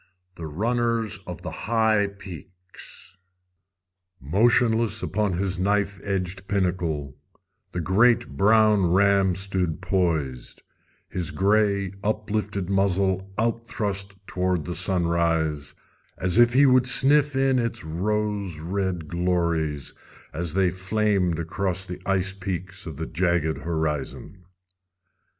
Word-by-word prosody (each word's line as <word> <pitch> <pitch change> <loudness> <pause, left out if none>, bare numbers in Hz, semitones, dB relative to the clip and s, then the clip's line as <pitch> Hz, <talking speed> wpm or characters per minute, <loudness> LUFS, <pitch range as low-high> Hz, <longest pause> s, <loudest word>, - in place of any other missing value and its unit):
The 80 -2 -7
Runners 115 +4 -1
of 90 -3 -7
the - - -5
High 110 -2 +1
Peaks 90 -1 -9 1.0
Motionless 110 - +2
upon 105 -1 0
his 95 0 -2
knife 100 0 0
edged 95 -1 -3
pinnacle, 85 -8 -1 0.5
the 90 - -3
great 110 +8 +3
brown 105 +2 +4
ram 100 -1 +3
stood 95 -4 -1
poised, 85 -9 -1 0.4
his 90 -4 -3
gray, 100 -1 +1
uplifted 105 -2 -2
muzzle 95 0 +1
out 115 +1 -1
thrust 100 -2 -3
toward 90 -4 -1
the 90 - -4
sunrise 85 -5 0 0.4
as 95 +4 +1
if 120 0 +6
he 140 +3 +6
would 130 -1 +4
sniff 140 +2 +5
in 135 -1 +2
its 115 -1 -2
rose 100 +2 -2
red 90 0 -3
glories 85 -4 -1 0.4
as 85 +1 -3
they 95 -2 +3
flamed 95 -2 0
across 95 +2 -2
the 90 0 -7
ice 95 -1 0
peaks 95 -1 -5
of 80 - -6
the 80 - -4
jagged 85 -2 0
horizon. 80 +3 -4
95 Hz, 115 wpm, -25 LUFS, 85-105 Hz, 1.0 s, if